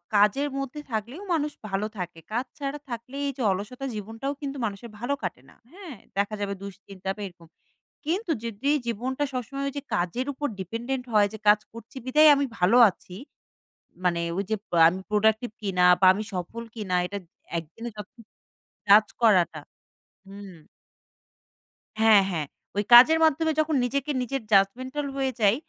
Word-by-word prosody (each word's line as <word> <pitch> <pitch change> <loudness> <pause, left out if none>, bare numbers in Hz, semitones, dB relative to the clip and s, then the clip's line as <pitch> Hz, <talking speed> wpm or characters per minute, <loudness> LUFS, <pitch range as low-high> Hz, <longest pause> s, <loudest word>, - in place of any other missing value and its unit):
কাজের 210 +8 +4
মধ্যে 275 +2 -5
থাকলেও 230 - -4
মানুষ 300 -2 0 0.2
ভালো 200 +1 -2
থাকে। 175 -2 -6
কাজ 240 +4 -1
ছাড়া 280 +1 -4
থাকলেই 250 +4 -5
যে - - -5
অলসতা 210 +8 -5
জীবনটাও 225 +7 -4
কিন্তু 280 -1 -4
মানুষের 210 +2 -6
ভালো 245 +5 -1
কাটে - - -4
না, - - -20 0.2
হ্যাঁ? 355 -6 -10 0.2
দেখা 205 +2 0
যাবে 200 -1 -2
দুশ্চিন্তা 195 -1 -8
বা 210 - -9
এরকম, 175 -2 -16 0.6
কিন্তু 350 +4 -1
যদি 230 +4 -3 0.2
জীবনটা 250 +5 -2
সবসময় 255 +3 -4
ওইযে 285 +1 -6
কাজের 210 +8 -2
উপর 290 +2 -3
dependent 235 +7 -4
হয় 210 -1 +5
যে - - -6
কাজ 210 0 +7
করছি 230 +2 -12
বিধায় 305 +4 +6
আমি 280 0 +1
ভালো 185 +7 +4
আছি। 180 -1 -13 0.9
মানে 175 -1 +2 0.2
ওই 200 - 0
যে 220 - +2
পা 175 - +1
আমি 185 +3 -3
productive 220 +2 +2
কিনা? 185 -3 +1 0.2
বা 190 - +6
আমি 210 - -3
সফল 185 +6 -5
কিনা? 205 -5 -3
এটা 200 +2 -5 0.4
একদিনে 170 +9 -7
যত 210 -2 -8 0.8
কাজ 210 +2 +8 0.2
করাটা 180 -8 +4 0.7
হুম। 195 0 -10 1.5
হ্যাঁ, 220 -2 +7
হ্যাঁ। 155 -4 -2 0.3
ওই 205 - +2
কাজের 255 +7 +9
মাধ্যমে 320 +1 +3
যখন 310 0 +1
নিজেকে 280 +4 -2
নিজের 270 +2 -3
judgmental 255 +9 +2
হয়ে 270 -1 0
যাই 205 +1 +5
225 Hz, 155 wpm, -26 LUFS, 200-275 Hz, 1.5 s, কাজের